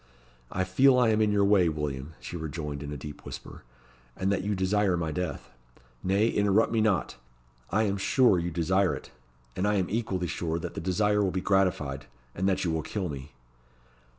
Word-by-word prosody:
"I 95 - 0
feel 125 +8 +4
I 125 -2 +4
am 110 0 +2
in 105 -1 +3
your 100 -1 +3
way, 100 -4 +4
William," 75 -1 -4
she - - -8
rejoined, 75 -3 -5
in 70 0 -6
a 75 - -4
deep 75 +2 -9
whisper; - - -9 0.6
"and 95 +1 0
that 95 -1 0
you 105 +1 -1
desire 95 0 +1
my 80 -2 -2
death. 80 -3 -4 0.5
Nay, 100 +4 +2
interrupt 105 +2 +2
me 115 -1 +2
not; 105 -4 +1 0.5
I 110 +4 +2
am 100 -2 0
sure 105 -1 +4
you 85 +1 -2
desire 90 +3 +1
it; - - -10 0.4
and 95 - 0
I 105 - +2
am 95 -2 0
equally 100 -5 -1
sure 85 -1 -2
that 85 - -5
the - - -5
desire 105 +4 +2
will 95 - +2
be 95 - -2
gratified, 90 -8 0 0.3
and 95 +2 0
that 95 0 0
you 85 - +1
will 80 0 -1
kill 95 +3 -3
me." 70 0 -8
95 Hz, 200 wpm, -28 LUFS, 80-105 Hz, 0.6 s, feel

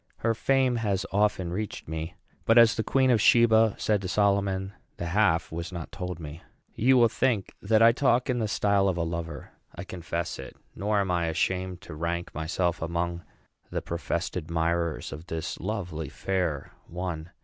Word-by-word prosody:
Her 115 0 +1
fame 130 +1 +2
has 100 -4 -1
often 95 -4 +1
reached 105 +1 -4
me; 80 +2 -5 0.3
but, 115 - +4
as 115 -2 +8
the 110 - -1
Queen 130 +3 +2
of 115 -4 +3
Sheba 115 -2 +5
said 105 -2 +1
to 95 - -4
Solomon, 100 -1 +1 0.2
the - - -4
half 90 -1 +2
was 85 +2 -5
not 85 -2 -6
told 90 -2 -5
me. 80 +1 -8 0.3
You 130 +3 +4
will 120 -1 +6
think 110 -2 0
that 110 +2 +3
I 115 - +8
talk 125 0 +2
in 125 -1 0
the 110 - 0
style 100 -1 +2
of 95 -2 0
a 85 - 0
lover. 85 0 -5 0.2
I - - -6
confess 85 -2 -4
it; - - -9 0.2
nor 105 +1 0
am 95 -2 -1
I 85 -1 +1
ashamed 90 +2 -1
to 100 - -10
rank 85 +2 -3
myself 85 +2 -1
among 85 +1 -2 0.5
the - - -3
professed 85 0 -3
admirers 85 -1 -1
of 80 +3 -9
this 80 -1 -4
lovely 90 -6 -4
fair 90 -7 -2 0.2
one. 85 -2 -5
95 Hz, 180 wpm, -27 LUFS, 85-110 Hz, 0.5 s, as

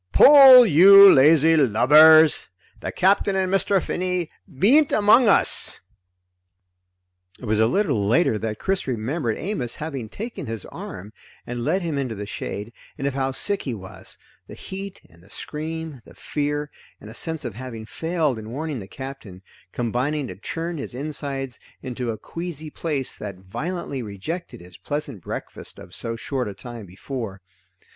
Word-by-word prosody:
"Pull, 270 -3 +9
you 195 +3 +8
lazy 155 +3 +5
lubbers! 155 +5 +6 0.3
The - - -5
Capt'n 195 +1 +2
and 190 0 -1
Mr. 195 0 +2
Finney 180 -2 -3 0.2
bean't 250 - +3
among 215 +4 +5
us!" - - +2 1.6
It - - -9
was 110 -1 0
a 110 - +4
little 140 - 0
later 115 -2 +2
that 110 -1 -4
Chris 195 - -2
remembered 120 +1 -2
Amos 150 - -3
having 140 -8 -6
taken 230 - -7
his 115 -3 -5
arm 100 +4 -9 0.3
and 120 -1 -5
led 185 +8 0
him 155 -4 -2
into 125 -5 -3
the 105 0 -6
shade, 105 +2 -6 0.2
and 135 - -5
of 140 - -1
how 135 0 -1
sick 200 +9 -2
he 125 -4 -4
was 95 -2 -9 0.3
the - - -11
heat 195 0 -8
and 85 0 -22
the 95 - -20
scream, 155 +1 -6
the 85 -1 -17
fear, 145 +4 -3 0.3
and - - -13
a 110 - -10
sense 160 +3 0
of 120 - -5
having 115 -1 -8
failed 160 -2 -2
in 110 0 -9
warning 145 +2 -5
the 95 - -9
Captain, 130 -8 -10 0.3
combining 130 +5 -2
to - - -8
churn 165 - -5
his 130 - -6
insides 135 -2 -4 0.2
into 125 -1 -4
a 110 - -3
queasy 165 -1 -7
place 145 -6 -4
that 100 -3 -8
violently 140 - -5
rejected 115 - -7
his 90 0 -14
pleasant 145 - -5
breakfast - - -6
of - - -13
so 115 0 -5
short 125 +2 -3
a 100 - -7
time 115 0 -10
before. 100 +2 -7
140 Hz, 160 wpm, -23 LUFS, 115-165 Hz, 1.6 s, Pull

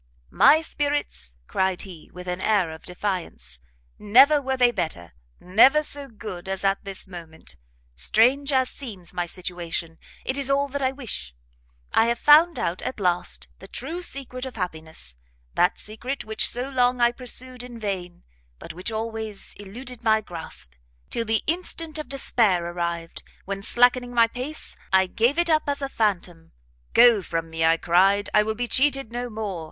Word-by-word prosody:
"My 315 +2 +6
spirits!" 285 - -3
cried 190 - -1
he, 180 -5 -11
with 180 0 -10
an 180 +1 -3
air 200 -6 +2
of 160 - -10
defiance, 180 - -5 0.4
"never 265 +8 +6
were 265 -1 -2
they 245 -1 +5
better, 85 - -4 0.3
never 255 +11 +5
so 285 -1 -3
good 205 -6 -8
as 195 0 -3
at 195 0 +1
this 195 -1 -6
moment. 170 -4 -9 0.4
Strange 250 - +3
as 260 -1 +3
seems 200 -11 -7
my 175 -1 -2
situation, 170 -2 -5 0.3
it 265 +2 -1
is 275 -1 0
all 280 +1 +2
that 285 +1 -4
I 260 -1 +2
wish; 220 - -4 0.6
I 225 - +4
have 235 0 +1
found 315 +6 +6
out, 170 +2 -2
at 260 - -5
last, 180 -2 -1
the - - -12
true 345 +2 -5
secret 260 -6 -5
of 260 - -9
happiness! 160 - -6 0.4
that 180 - +2
secret 245 +6 -5
which 220 0 +1
so 245 +2 -2
long 250 -2 +1
I 240 0 +4
pursued 255 0 -5
in 245 -1 -9
vain, 185 -5 -5 0.3
but - - -9
which 180 +7 -4
always 220 -2 -5
eluded 235 +5 -9
my 220 -1 +4
grasp, 165 - -7 0.4
till 230 - -1
the 220 0 +1
instant 330 -1 -2
of 300 -4 -6
despair 220 -10 +2
arrived, 170 -1 -4 0.2
when, 195 0 -4
slackening 245 +3 +3
my 230 -1 +6
pace, 255 +7 -7 0.2
I 190 0 +5
gave 235 - +1
it 345 -1 +2
up 310 -2 +2
as 285 - -1
a - - 0
phantom. 180 -8 -2 0.4
Go 235 -3 +7
from 165 -2 -4
me, 160 0 -2
I 165 0 +4
cried, 195 +5 +3
I 210 - +6
will 220 +1 -2
be 245 +2 -2
cheated 270 -2 +2
no 245 +1 -4
more! 210 -5 -4
220 Hz, 170 wpm, -24 LUFS, 180-260 Hz, 0.6 s, Go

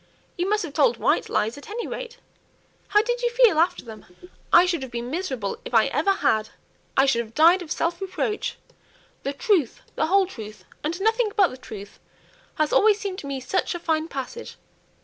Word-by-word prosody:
You 360 +2 -1
must 425 -1 +1
have 315 -5 -6
told 475 - +3
white - - +1
lies, 225 +6 -1
at 285 - -13
any 460 +3 -4
rate. - - -6 0.7
How 420 0 +4
did 485 +1 -2
you 480 - +2
feel 475 -8 +4
after 335 -4 +1
them?" 220 -2 -11 0.4
"I 345 +1 +7
should 345 -4 -1
have 265 - -6
been 240 +1 -5
miserable 265 - -3
if 240 - -5
I 225 - +6
ever 320 +7 0
had. 220 - +1 0.5
I 270 - +6
should 240 -4 +2
have 225 0 -16
died 335 +4 +6
of 330 -3 -9
self 340 +3 -1
reproach. 390 +2 -3 0.6
'The 275 - -3
truth, 360 - +1
the 315 - 0
whole 390 +2 +4
truth, 220 - -10 0.2
and 330 +5 -2
nothing 445 +1 +2
but 390 -5 +5
the - - -9
truth,' 205 -5 -10 0.6
has 310 -1 0
always 420 0 +5
seemed 400 -3 -4
to 280 - -8
me 275 -1 -3
such 350 +7 -1
a - - -4
fine 320 -2 0
passage. 275 - -6
335 Hz, 200 wpm, -24 LUFS, 265-410 Hz, 0.7 s, I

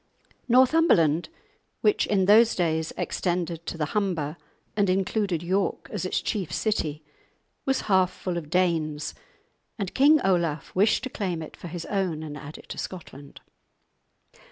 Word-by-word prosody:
Northumberland, 245 - +4 0.5
which 420 -2 +3
in 195 -3 +2
those 220 +3 +6
days 160 -2 0
extended 170 -2 -2
to - - -4
the 155 - 0
Humber, 170 -8 -1 0.4
and 205 -2 +2
included 190 -2 0
York 190 +3 -1
as - - -3
its - - 0
chief 200 -8 -2
city, 155 -8 -1 0.6
was 265 0 +2
half 185 -3 +3
full 180 -1 -4
of 160 -4 -5
Danes, 160 -4 0 0.6
and 195 -5 -4
King 295 +3 +6
Olaf 170 -5 0
wished 205 +6 +3
to 260 - -4
claim 180 -5 -3
it 155 - -10
for - - -9
his 170 0 -6
own, 185 -6 -1
and 150 -2 -6
add 150 +1 -9
it - - -15
to - - -6
Scotland. 145 -6 -8
180 Hz, 150 wpm, -26 LUFS, 160-205 Hz, 0.6 s, those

